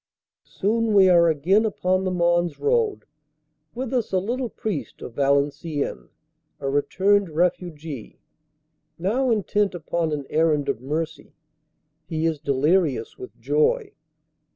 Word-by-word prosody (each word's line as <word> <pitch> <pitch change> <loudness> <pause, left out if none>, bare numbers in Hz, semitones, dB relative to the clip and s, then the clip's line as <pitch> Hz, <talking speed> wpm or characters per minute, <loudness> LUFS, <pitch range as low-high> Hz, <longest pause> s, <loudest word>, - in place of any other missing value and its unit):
Soon 220 +2 0
we 190 -2 +7
are 170 -1 +6
again 175 +8 +3
upon 185 -3 0
the - - +1
Mons 175 -2 +1
Road, 450 -2 +1 0.7
with 255 +1 -4
us 245 -4 0
a 190 - +2
little 240 +6 -2
priest 160 - -5
of 120 - -8
Valenciennes, 140 +2 -1 0.5
a 140 - -4
returned 190 +8 +2
refugee, 160 -5 -3 0.8
now 230 +10 0
intent 205 -3 +1
upon 165 -1 -2
an 145 -2 -3
errand 155 -3 +2
of 125 -4 -2
mercy. 155 +4 -4 0.7
He 160 0 -2
is 160 -2 0
delirious 140 -2 +1
with 385 - -10
joy. 455 -1 +1
175 Hz, 125 wpm, -23 LUFS, 150-210 Hz, 0.8 s, we